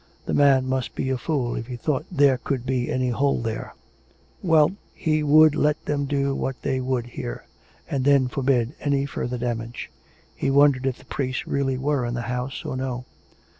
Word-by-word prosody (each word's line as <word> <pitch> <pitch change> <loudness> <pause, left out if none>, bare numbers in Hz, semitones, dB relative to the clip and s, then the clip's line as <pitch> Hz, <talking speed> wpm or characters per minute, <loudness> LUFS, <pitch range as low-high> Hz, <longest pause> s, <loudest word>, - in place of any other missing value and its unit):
The - - -2
man 135 -2 +4
must 130 -1 -2
be 130 - -1
a 130 - 0
fool 130 -6 -1
if 115 - -5
he 125 - -5
thought 145 +5 -2
there 140 -6 +4
could 130 -1 -3
be 125 -2 -1
any 130 -1 0
hole 140 +4 +1
there!... 115 -1 -4 0.7
Well; 160 -3 +4 0.2
he 155 -3 +1
would 155 +1 +6
let 150 0 +1
them 145 -1 -1
do 140 0 0
what 135 -1 -3
they 130 -1 0
would 130 -2 -1
here; - - -6 0.4
and 135 -2 -1
then 140 -2 +4
forbid 125 -1 +1
any 140 -1 +1
further 125 -2 -3
damage.... 115 -1 -4 0.4
He 135 - -1
wondered 135 -1 +4
if 130 - -1
the - - -18
priest 130 -1 -3
really 135 -2 0
were 140 0 0
in 120 - -3
the 120 - -2
house 125 +2 -4
or - - -3
no. 130 -1 -3
130 Hz, 190 wpm, -24 LUFS, 125-140 Hz, 0.7 s, would